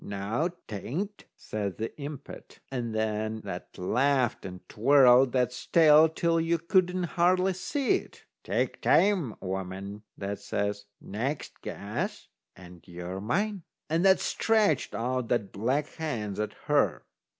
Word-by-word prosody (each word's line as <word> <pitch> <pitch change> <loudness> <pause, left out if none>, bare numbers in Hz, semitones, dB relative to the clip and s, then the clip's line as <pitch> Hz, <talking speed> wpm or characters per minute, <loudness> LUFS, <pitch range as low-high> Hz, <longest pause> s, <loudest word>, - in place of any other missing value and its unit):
"Noo, 105 - -2 0.2
'tain't," 170 - -5
says 100 -3 -4
the 110 +1 -2
impet. 140 -1 -8
And 120 -4 -3
then 110 0 -1
that 95 -3 -8
laughed 125 +6 +1
and 90 0 -11
twirled 130 +1 +5
that's 125 -1 -1
tail 160 -1 +7
till 165 +1 +1
you 165 +1 +1
couldn't 180 +2 +1
hardly 180 +2 +2
see 260 - 0
it. - - -13 0.2
"Take - - -1
time, 185 - +3
woman," 95 +2 -5 0.2
that 100 0 -4
says; 100 0 -2
"next 130 +8 -4
guess, - - -5 0.3
and 90 -2 -13
you're 90 +2 -6
mine." 195 - -1 0.3
And 165 +2 +2
that 190 0 +6
stretched 220 - +1
out 125 +2 -1
that's 105 -6 0
black 130 +9 0
hands 115 -12 -4
at 105 0 -2
her. - - +2
125 Hz, 130 wpm, -28 LUFS, 100-165 Hz, 0.3 s, tail